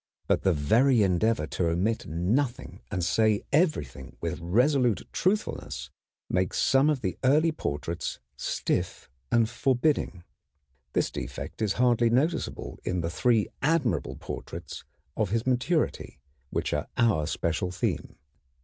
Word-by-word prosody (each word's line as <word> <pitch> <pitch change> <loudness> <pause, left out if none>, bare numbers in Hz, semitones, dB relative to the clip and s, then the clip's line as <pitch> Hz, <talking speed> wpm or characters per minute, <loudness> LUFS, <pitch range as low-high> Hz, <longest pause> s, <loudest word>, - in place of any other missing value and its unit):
But - - +2
the 95 - +3
very 110 - +4
endeavor 95 -1 +2
to 85 +2 -1
omit 95 +7 0
nothing 110 - -1
and 90 -4 -1
say 110 +2 +2
everything 145 - 0
with - - -3
resolute 120 - +2
truthfulness 75 - -1 0.4
makes 90 0 0
some 135 +3 +4
of 145 -4 0
the 90 -4 -3
early 150 +5 +4
portraits 80 - -3 0.2
stiff - - -2 0.2
and 115 -2 +4
forbidding. 125 - 0 0.7
This - - +1
defect - - -6
is 105 -2 +1
hardly 120 -1 +3
noticeable 135 +9 -1
in 90 -1 -1
the 85 0 -2
three 115 +2 +2
admirable 135 - +1
portraits 85 -2 -7 0.3
of 110 -4 0
his 115 +3 0
maturity, 130 +6 0 0.3
which - - -2
are - - -1
our 105 -11 +3
special 85 +2 -1
theme. 90 0 -2
110 Hz, 130 wpm, -27 LUFS, 90-130 Hz, 0.7 s, very